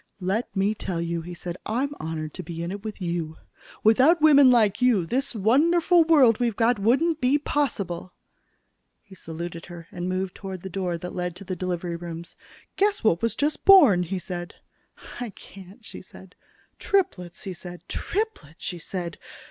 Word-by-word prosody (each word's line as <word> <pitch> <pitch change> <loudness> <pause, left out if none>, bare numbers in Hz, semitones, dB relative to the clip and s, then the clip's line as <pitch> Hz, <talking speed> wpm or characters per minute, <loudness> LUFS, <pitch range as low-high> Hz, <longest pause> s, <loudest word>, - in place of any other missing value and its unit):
"Let 195 +6 -2
me 200 +2 +2
tell 185 -5 -4
you," 170 0 -2
he 175 +2 -8
said, 175 0 -6
"I'm 260 +6 -1
honored 155 -1 -5
to 185 - -6
be 170 0 -6
in 170 - -4
it 200 +1 -7
with 215 -3 -6
you. 170 -2 -3 0.5
Without 260 +10 +5
women 285 -3 +7
like 220 -3 +3
you, 235 -8 +3
this 260 +6 -2
wonderful 330 - +4
world 270 -9 +5
we've 235 -3 0
got 230 0 +2
wouldn't 285 +10 +2
be 260 +3 +3
possible." 200 -13 -2 0.9
He 200 - -17
saluted 170 -1 -7
her 170 -2 -10
and 180 0 -4
moved 185 0 -2
toward 190 -3 -8
the 190 - -7
door 180 -2 -2
that 180 +2 -7
led 180 -1 -3
to 180 - -10
the 185 -1 -4
delivery 175 -1 -3
rooms. 170 0 -8 0.4
"Guess 410 +1 +1
what 210 -5 +3
was 230 0 0
just 295 +1 -1
born," 290 - +7
he 180 +2 -3
said. 175 -2 -6 0.6
"I 245 -2 -4
can't," 195 +3 -14
she - - -9
said. 190 0 -15 0.5
"Triplets!" 215 - -1
he 190 - -5
said. 175 0 -10
"Triplets!" 395 - -4
she 175 -3 -4
said. 170 0 -6
190 Hz, 175 wpm, -25 LUFS, 175-250 Hz, 0.9 s, women